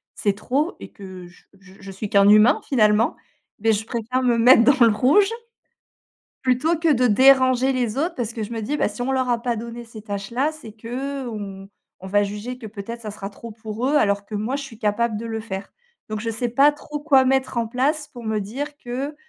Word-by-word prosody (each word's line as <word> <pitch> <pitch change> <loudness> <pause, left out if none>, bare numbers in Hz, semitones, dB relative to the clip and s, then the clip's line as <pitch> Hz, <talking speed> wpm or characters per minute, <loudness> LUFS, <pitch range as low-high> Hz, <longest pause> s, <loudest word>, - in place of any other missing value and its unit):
c'est 205 - 0
trop 275 - -1
et - - -9
que 185 -2 -10
je 175 - -20 0.2
j 190 -1 -18
je 195 -1 -9
suis 195 +2 -6
qu'un 200 0 +5
humain, 215 +7 +6
finalement. 215 -3 +2 0.4
Beh 225 +1 +2
je 215 +1 -2
préfère 240 +2 -2
me 240 -2 +2
mettre 230 +1 +7
dans 260 -1 +5
le 220 - +3
rouge 310 - +4 1.1
plutôt 265 +6 +1
que 325 -1 +2
de 250 -1 +2
déranger 260 +2 +5
les 245 -3 -1
autres 335 +4 -1
parce 235 -6 -3
que 225 - -4
je 220 - -8
me 225 - -3
dis: 285 +8 -2
«Bah - - +1
si 245 - -6
on 265 - -1
leur 260 -1 0
a 235 -1 0
pas 240 -1 -1
donné 235 +1 -7
ces 225 -2 -12
tâches-là. 235 +8 -2
C'est 300 -9 -12
que, 260 +5 -5
heu, - - -4
on 195 -2 -7 0.3
on - - -7
va 205 +1 +3
juger 210 +5 -5
que 225 - -9
peut-être 220 +3 -7
ça 210 - -5
sera 200 -1 -7
trop 230 +3 -10
pour 220 +2 -5
eux 300 - +2
alors 200 -6 +2
que 215 - -8
moi 215 +5 -2
je 285 - -5
suis 240 -5 -11
capable 215 +1 0
de 230 - -6
le 225 -1 -4
faire». 200 -3 -7 0.4
Donc 215 0 -4
je 230 +1 -3
sais 235 +2 -2
pas 275 +5 +4
trop 295 0 -7
quoi 280 -3 +4
mettre 265 -1 0
en 230 - 0
place 290 +6 -1
pour 240 -2 -11
me 220 -1 -1
dire 275 +9 -5
que 265 +5 -5
235 Hz, 235 wpm, -22 LUFS, 210-265 Hz, 1.1 s, mettre